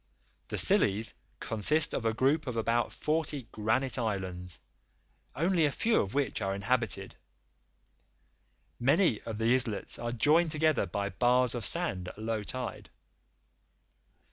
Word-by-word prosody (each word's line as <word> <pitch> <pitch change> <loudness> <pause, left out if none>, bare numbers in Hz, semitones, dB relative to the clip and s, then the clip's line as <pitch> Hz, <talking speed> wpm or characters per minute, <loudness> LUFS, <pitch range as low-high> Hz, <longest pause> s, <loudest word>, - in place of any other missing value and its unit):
The - - -4
Scillies 105 +3 +2 0.3
consist 150 +9 0
of 115 - -2
a 110 - +2
group 140 +5 +2
of 120 -2 -3
about 115 +1 +1
forty 155 -3 -2
granite 120 +5 0
islands, 95 -5 -3 0.8
only 170 +2 +2
a 145 - +3
few 230 - +2
of 100 +5 -5
which 140 -6 0
are 95 0 -1
inhabited. 100 -2 -1 1.6
Many 140 - +3
of 110 -2 -4
the 115 +2 +3
islets 120 -5 -1
are 120 0 -3
joined 155 +8 +3
together 155 -3 +1
by 100 +3 -2
bars 125 +5 +2
of 120 -2 -2
sand 165 - -2
at - - -8
low 110 0 -2
tide. 125 +2 -6
120 Hz, 135 wpm, -30 LUFS, 105-145 Hz, 1.6 s, a